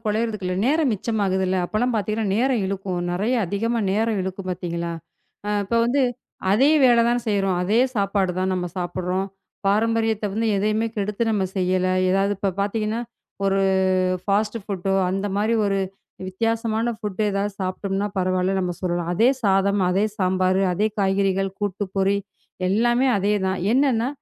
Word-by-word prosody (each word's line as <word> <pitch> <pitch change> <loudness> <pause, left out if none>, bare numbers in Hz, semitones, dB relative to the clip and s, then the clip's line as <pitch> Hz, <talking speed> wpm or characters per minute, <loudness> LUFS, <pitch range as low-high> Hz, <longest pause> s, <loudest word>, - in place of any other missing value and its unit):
கொழையிறதுக்கு 215 -1 -1
இல்ல. 180 - -1
நேரம் 300 -2 +2
மிச்சமாகுது 200 -3 0
இல்ல. 185 +1 0
அப்பலாம் 240 +5 0
பாத்தீங்கன்னா 215 +1 -1
நேரம் 250 -1 +2
இழுக்கும். 190 -2 -3
நிறைய 210 +8 0
அதிகமா 225 +5 -1
நேரம் 220 0 +1
இழுக்கும் 190 0 -5
பார்த்தீங்களா! 170 -1 -3 0.5
ஆ - - -1
இப்ப 215 +4 -3
வந்து 265 +3 +2 0.5
அதே 265 +8 +4
வேலை 240 -2 +6
தான 240 +1 +2
செய்றோம். 195 -3 +1
அதே 215 +6 +2 0.2
சாப்பாடு 200 -2 +1
தான் 185 0 0
நம்ம 180 -1 -2
சாப்புட்றோம். 180 +2 -2 0.4
பாரம்பரியத்தை 220 +1 +1
வந்து 225 +2 0
எதையுமே 215 +3 +1
கெடுத்து 210 +2 -2
நம்ம 205 -3 +1
செய்யல. 185 0 +1 0.2
ஏதாவது 195 +1 +2
இப்ப 195 -2 -1
பாத்தீங்கன்னா, 215 +2 -1 0.4
ஒரு 195 0 +2 0.6
ஃபாஸ்ட் 210 +2 0
ஃபுட்டோ 195 -1 -2 0.2
அந்த 195 +2 -2
மாரி 215 +3 +1
ஒரு 195 0 +1 0.5
வித்தியாசமான 225 +3 -1
ஃபுட் 210 -3 -6
எதாவது 200 +1 -1
சாப்பிட்டம்னா 195 +2 -2
பரவாயில்லன்னு 185 +1 +1
நம்ம 180 -1 -2
சொல்லலாம். 175 -1 -1
அதே 230 +8 +4
சாதம், 195 0 +2
அதே 195 +4 +2
சாம்பாரு, 185 0 +2
அதே 210 +4 +1
காய்கறிகள், 195 0 +1
கூட்டு, 205 -1 -2
பொரி 195 +1 +2 0.5
எல்லாமே 240 +6 +2
அதே 200 +2 +1
தான். 190 0 0
என்னன்னா 255 -3 +2
200 Hz, 150 wpm, -23 LUFS, 190-220 Hz, 0.6 s, வேலை